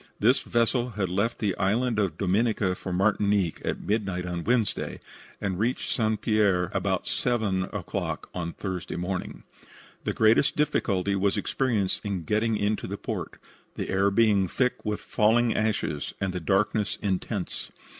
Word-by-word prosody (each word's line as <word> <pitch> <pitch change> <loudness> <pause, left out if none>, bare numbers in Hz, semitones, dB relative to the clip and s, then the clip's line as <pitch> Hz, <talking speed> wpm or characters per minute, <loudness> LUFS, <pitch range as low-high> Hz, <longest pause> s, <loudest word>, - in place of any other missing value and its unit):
This 125 +6 +4
vessel 120 +1 +1
had 95 -3 0
left 100 +6 0
the 100 -4 0
Island 110 +4 +1
of 100 -4 0
Dominica 100 0 +1
for 90 0 -6
Martinique 100 -1 +1
at - - -2
midnight 100 -4 -1
of 85 -1 -4
Wednesday, 120 -3 0 0.4
and 95 -3 -2
reached 120 +4 0
St. 110 -2 +1
Pierre 100 -5 +2
about - - 0
7 110 -7 0
o'clock - - -4 0.3
Thursday 95 -2 -4
morning. 90 -9 -4 0.6
The - - -1
greatest 110 +6 +4
difficulty 100 -9 +1
was 100 0 +1
experienced 110 -8 0
in 100 -5 -2
getting 110 +4 +1
into 105 +1 -1
port, - - -5 0.4
the - - -4
air 95 +1 +3
being 100 -2 +3
thick 125 +6 0
with 105 -1 -2
falling 115 +2 +3
ashes 105 -9 -1
and 95 -2 -1
the 90 - -2
darkness 100 +4 +1
intense. 95 0 -2
100 Hz, 145 wpm, -27 LUFS, 95-110 Hz, 0.6 s, This